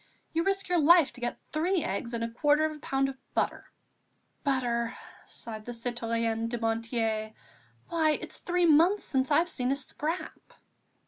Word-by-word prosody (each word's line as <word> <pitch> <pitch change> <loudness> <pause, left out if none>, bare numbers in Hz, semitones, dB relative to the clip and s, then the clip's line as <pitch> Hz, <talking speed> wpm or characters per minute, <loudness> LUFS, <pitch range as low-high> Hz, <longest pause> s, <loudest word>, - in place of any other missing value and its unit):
You 330 +1 +1
risk 390 +1 0
your 355 -1 +2
life 330 0 +6
to 245 - -11
get 240 - -2
three 340 +3 +1
eggs 235 +5 -3
and 230 - -2
a - - 0
quarter 295 +5 +3
of 310 0 -2
a - - -12
pound 270 -1 0
of 270 -1 -7 0.2
butter." - - -1 0.8
"Butter!" 245 -4 0 0.3
sighed 215 -2 -8
the 245 - -5
citoyenne 230 -1 -1
Dumonteil, 225 -1 -1 0.5
"why, 320 -3 +2
it's - - -8
three 355 0 +1
months 335 +6 +5
since 265 -1 0
I've 325 +4 +4
seen 255 -6 -1
a - - +2
scrap!" 305 +5 -5
265 Hz, 165 wpm, -29 LUFS, 230-320 Hz, 0.8 s, life